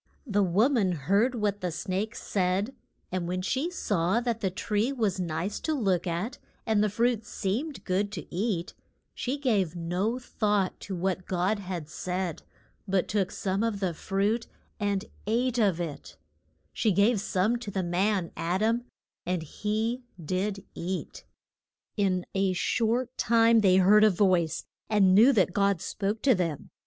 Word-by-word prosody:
The 205 Hz, -5 st, +1 dB
wo 195 Hz, +5 st, +4 dB
man 220 Hz, -10 st, +2 dB
heard 200 Hz, -, +1 dB
what 205 Hz, -2 st, -1 dB
the 180 Hz, -, -1 dB
snake 195 Hz, +7 st, -3 dB
said, 195 Hz, +5 st, -1 dB, 0.4 s
and 180 Hz, -2 st, -2 dB
when 185 Hz, +1 st, -2 dB
she 265 Hz, -, 0 dB
saw 205 Hz, -, 0 dB
that 235 Hz, -2 st, -2 dB
the 195 Hz, -, +1 dB
tree 210 Hz, +6 st, -1 dB
was 215 Hz, -8 st, 0 dB
nice 175 Hz, +3 st, -2 dB
to 315 Hz, -, -1 dB
look 190 Hz, -, +1 dB
at 175 Hz, +9 st, -3 dB, 0.3 s
and 215 Hz, -2 st, +2 dB
the 215 Hz, -, +2 dB
fruit 230 Hz, +2 st, +1 dB
seemed 245 Hz, +11 st, -3 dB
good 200 Hz, +2 st, 0 dB
to 165 Hz, -7 st, -5 dB
eat, 185 Hz, -2 st, -1 dB, 0.4 s
she 260 Hz, +3 st, -2 dB
gave 205 Hz, -, +1 dB
no 180 Hz, +7 st, -1 dB
thought 210 Hz, -6 st, 0 dB
to 195 Hz, -, -5 dB
what 185 Hz, +1 st, -2 dB
God 185 Hz, +3 st, 0 dB
had 180 Hz, -5 st, -5 dB
said, 180 Hz, +1 st, -3 dB, 0.5 s
but 190 Hz, -1 st, +1 dB
took 200 Hz, -2 st, 0 dB
some 195 Hz, +1 st, -2 dB
of 225 Hz, -3 st, 0 dB
the 185 Hz, -3 st, -1 dB
fruit 200 Hz, +7 st, -1 dB, 0.3 s
and 205 Hz, -1 st, 0 dB, 0.2 s
ate 245 Hz, +2 st, +1 dB
of 195 Hz, -6 st, +2 dB
it; 165 Hz, -4 st, -6 dB, 0.6 s
she 220 Hz, -, +2 dB
gave 205 Hz, +2 st, +3 dB
some 200 Hz, +5 st, +1 dB
to 235 Hz, -3 st, -7 dB
the 190 Hz, -1 st, -2 dB
man, 185 Hz, +1 st, 0 dB
Ad 180 Hz, +5 st, -1 dB
am, 230 Hz, +2 st, +1 dB, 0.4 s
and 180 Hz, -2 st, -1 dB
he 220 Hz, -, -2 dB, 0.2 s
did 190 Hz, +5 st, -2 dB
eat. 180 Hz, +2 st, -5 dB, 0.7 s
In 185 Hz, -3 st, +1 dB
a 195 Hz, -1 st, +1 dB
short 235 Hz, +6 st, 0 dB
time 230 Hz, 0 st, +5 dB
they 190 Hz, -3 st, +5 dB
heard 200 Hz, +3 st, +6 dB
a 215 Hz, -, +7 dB
voice, 180 Hz, -4 st, +2 dB, 0.2 s
and 200 Hz, -4 st, +4 dB
knew 225 Hz, +8 st, +7 dB
that 185 Hz, -5 st, +2 dB
God 200 Hz, -2 st, +2 dB
spoke 200 Hz, +4 st, -3 dB
to 270 Hz, -, +6 dB
them. 170 Hz, -7 st, -2 dB
200 Hz, 165 wpm, -28 LUFS, 185-220 Hz, 0.7 s, a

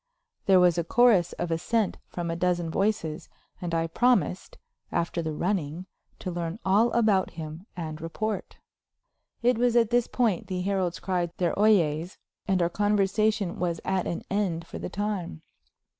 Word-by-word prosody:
There 190 Hz, -2 st, +7 dB
was 175 Hz, -1 st, +4 dB
a -, -, +1 dB
chorus 215 Hz, -2 st, +4 dB
of 170 Hz, -, -3 dB
assent 205 Hz, +6 st, 0 dB
from 170 Hz, -1 st, -4 dB
a -, -, -2 dB
dozen 175 Hz, -1 st, 0 dB
voices, 185 Hz, -5 st, -1 dB, 0.3 s
and 175 Hz, -1 st, -3 dB
I 165 Hz, 0 st, +1 dB
promised, 200 Hz, +1 st, +1 dB, 0.3 s
after 170 Hz, 0 st, -1 dB
the 160 Hz, -1 st, -3 dB
running, 175 Hz, 0 st, -2 dB, 0.3 s
to 185 Hz, -, -5 dB
learn 170 Hz, +1 st, -3 dB
all 210 Hz, +5 st, +4 dB
about 215 Hz, -5 st, +2 dB
him 160 Hz, +4 st, -7 dB
and 155 Hz, -2 st, -5 dB
report. 210 Hz, +6 st, -4 dB, 0.9 s
It 245 Hz, -1 st, +3 dB
was 245 Hz, -1 st, +2 dB
at 235 Hz, -1 st, +4 dB
this 240 Hz, -1 st, +3 dB
point 225 Hz, -8 st, 0 dB
the 185 Hz, -1 st, -2 dB
heralds 185 Hz, -2 st, -1 dB
cried 180 Hz, -3 st, -1 dB
their 175 Hz, -2 st, +1 dB
"Oyes," 175 Hz, -5 st, +2 dB, 0.3 s
and 190 Hz, -3 st, +2 dB
our -, -, +3 dB
conversation 205 Hz, 0 st, +1 dB
was 170 Hz, -2 st, -1 dB
at 190 Hz, -1 st, 0 dB
an 170 Hz, -, -3 dB
end 185 Hz, -5 st, 0 dB
for -, -, -8 dB
the -, -, -5 dB
time. 195 Hz, -, -3 dB
185 Hz, 160 wpm, -27 LUFS, 170-210 Hz, 0.9 s, There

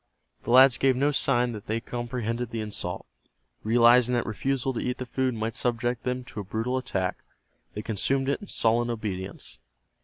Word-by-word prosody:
The -, -, -8 dB
lads 130 Hz, 0 st, +7 dB
gave 135 Hz, -1 st, +3 dB
no 140 Hz, +3 st, +2 dB
sign 125 Hz, -3 st, +2 dB
that 105 Hz, -3 st, -8 dB
they 110 Hz, +1 st, 0 dB
comprehended 120 Hz, 0 st, -3 dB
the 115 Hz, -, -4 dB
insult. 100 Hz, -4 st, -3 dB, 0.6 s
Realizing 120 Hz, +2 st, +5 dB
that 120 Hz, -, 0 dB
refusal 135 Hz, +4 st, -1 dB
to 120 Hz, -, -3 dB
eat 125 Hz, -, -2 dB
the 130 Hz, -, -5 dB
food 130 Hz, 0 st, -1 dB
might 110 Hz, +1 st, -3 dB
subject 120 Hz, 0 st, -1 dB
them 125 Hz, 0 st, -2 dB
to 115 Hz, -, -8 dB
a -, -, -3 dB
brutal 110 Hz, +6 st, -2 dB
attack, 95 Hz, -7 st, -2 dB, 0.6 s
they 105 Hz, -, -4 dB
consumed 135 Hz, +6 st, 0 dB
it 140 Hz, +9 st, 0 dB
in 205 Hz, -, -9 dB
sullen 120 Hz, -3 st, +1 dB
obedience. 95 Hz, -, -5 dB
120 Hz, 180 wpm, -27 LUFS, 110-125 Hz, 0.6 s, lads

